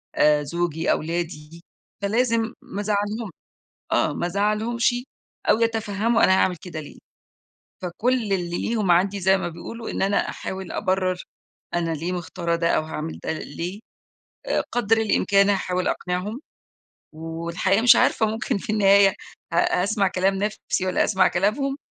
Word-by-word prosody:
آآ، 150 0 +4
زوجي، 165 +1 -1
أولادي، 165 0 -3 0.4
فلازم 225 +2 +1
ما 200 - -6
ازعلهُمش، 210 +1 -1 0.6
آه - - +2
ما - - -2
ازعلهُمش، 215 +6 +1 0.5
أو - - +5
يتفهّموا 225 0 +1
أنا - - +6
هاعمل 180 -1 +2
كده 165 -1 -7
ليه، 150 - -10 0.8
فكل 185 +8 0 0.2
اللي 175 -2 -1
ليهم 215 -5 0
عندي 195 +3 +2
زي 190 +1 +4
ما 175 - -3
بيقولوا 225 +7 -8
إن - - -3
أنا 195 +1 +2
أحاول 190 -1 -6
أبرّر 185 -1 0 0.5
أنا 170 -1 0
ليه 165 +3 -3
مختارة 170 -1 -2
ده 170 0 0
أو - - +2
هاعمل 155 0 -5
ده - - -1
ليه، 170 +6 -6 0.7
آآ، - - +1
قدر 225 -2 +2
الإمكان، 200 -2 +3
هاحاول 185 -2 0
أقنعهم 185 +8 -3 0.8
والحقيقة 170 +5 -1
مش 240 - +8
عارفة 220 - +3
ممكن 220 -1 -1
في 200 - -4
النهاية 200 -1 +6 0.4
ه 175 +1 +2
هاسمع 200 +1 +1
كلام 190 +1 +1
نَفْسي 205 -1 -2
والّا 185 - +2
هاسمع 190 -2 +3
كلامهم، 265 +10 0
190 Hz, 140 wpm, -23 LUFS, 175-215 Hz, 0.8 s, مش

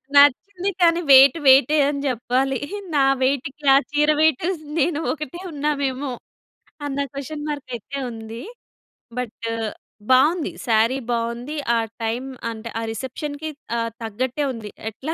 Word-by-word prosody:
నచ్చింది. 355 +8 +4
కానీ, 340 0 +5
వెయిట్ 270 +3 +9
వెయిటే 270 +3 +6
అని 280 -1 -2
చెప్పాలి. 255 +2 0 0.4
నా 275 - +4 0.2
వెయిట్‌కి 275 +2 -1
ఆ - - +8
చీర 295 +1 +2
వెయిటు, 315 0 +3 0.3
నేను 305 +1 +1
ఒకటే 310 +2 -7
ఉన్నామేమో, 280 -2 -1 0.7
అన్న 280 0 -3
క్వషన్ 295 +2 -6
మార్క్ 290 -3 -5
అయితే 250 +5 -7
ఉంది. 225 0 -8 0.8
బట్, 240 -2 -5 0.7
బావుంది. 300 +6 +4 0.2
సారీ 230 +3 +3
బావుంది. 235 +4 -2 0.2
ఆ - - +3 0.3
టైం 225 +3 -1 0.3
అంటే, 225 +1 -7
ఆ - - -3
రిసెప్షన్‌కి 285 +6 -5 0.3
ఆహ్, 230 0 -1
తగ్గట్టే 250 +6 -2
ఉంది. 220 -3 -7 0.2
ఎట్లా 275 +9 -5
270 Hz, 125 wpm, -22 LUFS, 240-295 Hz, 0.8 s, వెయిట్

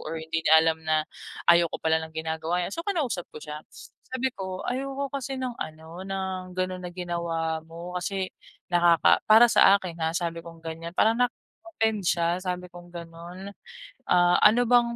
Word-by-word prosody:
or 160 +1 -5
hindi 160 0 -3
niya 160 -1 +6
alam 160 0 +1
na 155 -1 +1 0.4
ayoko 170 -1 +5
pala 160 0 +1
ng 160 - -8
ginagawa 160 +2 -2
n'ya. - - -4
So, 335 - -4
kinausap 290 - -1
ko - - -8
siya, 150 0 -7
s - - -14 0.2
sabi 260 0 -1
ko, 190 -1 -5
"Ayoko 275 +2 -2
kasi 270 0 -4
ng 255 -2 -3
ano, 160 0 -8
ng 190 -1 -4
ganon 185 0 -2
na 180 - -6
ginawa 170 -2 -3
mo 170 +2 -9
kasi 190 +1 -2 0.5
nakaka 175 -1 +4
para 225 +3 +9
sa 200 -3 +6
akin 180 -3 -7
ha," 160 - +1
sabi 170 -1 -4
kong 165 0 -12
ganyan, 165 +1 -6
"Parang 220 +1 +5
nakaka 245 - +1 0.3
offend 220 -8 0
siya," 170 0 +1
sabi 180 -1 -3
kong 175 0 -13
ganon. 170 +3 -9 0.6
"Ah, 175 0 +4
ano 230 +4 +6
bang 240 -1 +4
175 Hz, 180 wpm, -26 LUFS, 165-200 Hz, 0.6 s, para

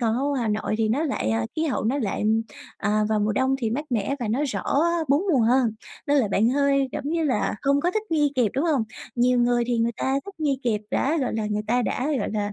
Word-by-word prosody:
còn 230 -1 +1
ở 260 - -1
ngoài 280 -3 0
Hà 225 - -1
Nội 215 0 -1
thì 220 -1 +1
nó 270 +8 +1
lại, 270 - -1
ờ 110 0 0
khí 320 - 0
hậu 270 -7 -1
nó 265 +6 +1
lại, 210 -7 -2 0.5
à, 210 0 +1
vào 215 -1 +1
mùa 210 +1 +1
đông 265 +3 +1
thì 225 -4 -1
mát 290 +6 -2
mẻ 230 +3 0
và 230 - -2
nó 240 +6 0
rõ 200 -5 -3 0.5
4 285 +5 +3
mùa 260 - +3
hơn. 240 +1 +3 0.4
Nên 290 0 +3
là 235 -7 +2
bạn 215 +4 +2
hơi, 275 0 +2
giống - - -4
như 325 0 0
là, 255 -8 0
không 280 +1 +2
có 355 - +1
thích 430 +2 -1
nghi 295 -3 +2
kịp, 240 -5 +2
đúng 280 +5 0
hông? 295 -8 +2 0.3
Nhiều 250 0 +3
người 240 0 +2
thì 240 -2 0
người 230 +1 +1
ta 265 - 0
thích 400 -1 -10
nghi 280 -3 +1
kịp 220 -4 0
đã 300 +5 +1
gọi 255 - -1
là, 220 -1 -1
người 210 0 -2
ta 245 +2 +2
đã, 255 - -1
gọi 205 - -2
là, 205 -1 -2
245 Hz, 270 wpm, -24 LUFS, 220-280 Hz, 0.5 s, 4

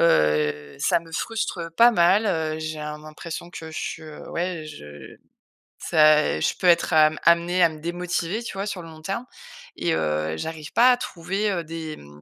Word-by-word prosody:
heu, 75 - +2
ça 160 - +3
me 165 0 -16
frustre 175 -4 -3
pas 240 +1 +7
mal. 190 +3 +4
Heu, 155 -4 -1
j'ai 155 -1 -5
un 150 0 -5
l'impression 155 +3 -8
que 160 -2 -8
je 155 -1 -6
ouais, 170 -2 -3
je 75 - -11 0.6
ça, 155 - +4
je - - +1
peux 185 - +1
être 175 0 +4
am 155 0 +5
amenée 170 +2 +4
à - - +8
me 155 -1 -10
démotiver, 175 +4 -2
tu - - -6
vois? 195 +1 -3
Sur 195 -3 -4
le - - -10
long 160 -1 -13
terme 195 +9 -4 0.5
et 170 - 0
heu, 75 +1 -1
j'arrive 155 - -6
pas 250 +2 +6
à 250 - +3
trouver, 195 -1 -2
heu, 175 -3 -2
des 160 -1 -6
m 75 - -14
165 Hz, 185 wpm, -24 LUFS, 155-180 Hz, 0.6 s, à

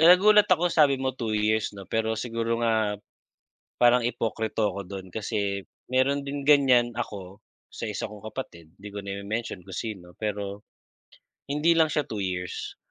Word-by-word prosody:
nagulat 195 +5 +7
ako 175 -1 +3
sabi 145 -4 +5
mo 130 0 -1
2 115 -4 -2
years 105 0 +1
'no 100 - -8
pero 110 +3 0
siguro 115 0 -1
nga, 110 -3 +2 0.8
parang 120 0 +5
ipokrito 110 -3 -1
ako 100 - -4
dun 95 0 -7
kasi 100 -2 -2 0.3
meron 135 +2 +2
din 140 0 -4
ganiyan 125 -5 +5
ako 100 -3 -6 0.3
sa - - -6
isa - - -3
kong 105 0 -12
kapatid, 85 -11 -8
'di 105 - -8
ko 100 0 -7
na 100 - -3
ime-mention 105 -1 -4
kung 95 -2 -8
sino, 95 -6 -6
pero, 105 -1 -3 0.9
hindi 150 +4 +3
lang 160 -1 +4
siya 150 -1 0
2 110 -4 -4
years, 90 -1 -4
110 Hz, 165 wpm, -26 LUFS, 100-130 Hz, 0.9 s, nagulat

